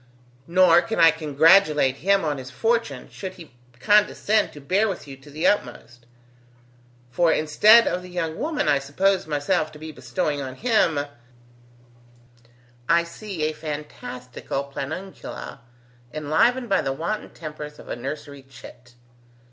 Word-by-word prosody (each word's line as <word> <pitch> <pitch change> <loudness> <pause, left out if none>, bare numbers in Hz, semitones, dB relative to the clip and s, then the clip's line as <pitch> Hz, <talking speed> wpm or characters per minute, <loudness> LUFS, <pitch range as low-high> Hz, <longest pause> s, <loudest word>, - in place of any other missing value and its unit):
Nor 175 -1 +5
can 175 +3 -4
I 165 -1 +8
congratulate 155 -2 +3
him 195 +2 +2
on 145 -3 -2
his 130 0 -8
fortune, 230 - -1
should 190 -1 -7
he 165 -6 -13 0.3
condescend 210 +6 +2
to 145 - -11
bear 190 +10 +1
with 185 -7 -5
you 135 - -9
to 135 +2 -17
the 155 +3 -4
utmost; 120 -8 -1 1.0
for 170 +4 +3
instead 210 +11 +5
of 180 - -1
the 180 - -11
young 165 -3 -3
woman 305 - -1
I 145 -2 +3
supposed 185 +7 0
myself 150 +1 0
to - - -11
be 155 +1 -8
bestowing 140 +2 -3
on 130 -1 -6
him, 210 - +2 1.9
I 170 0 +4
see 170 0 -7
a 155 +1 0
fantastical 145 -4 -6
planguncula 160 0 -7 0.5
enlivened 235 - +1
by 195 -3 +2
the 135 - -2
wanton 185 +10 -4
tempers 150 -2 -9
of - - -14
a - - -4
nursery 140 +3 -7
chit. 125 -1 -15
155 Hz, 140 wpm, -23 LUFS, 140-190 Hz, 1.9 s, I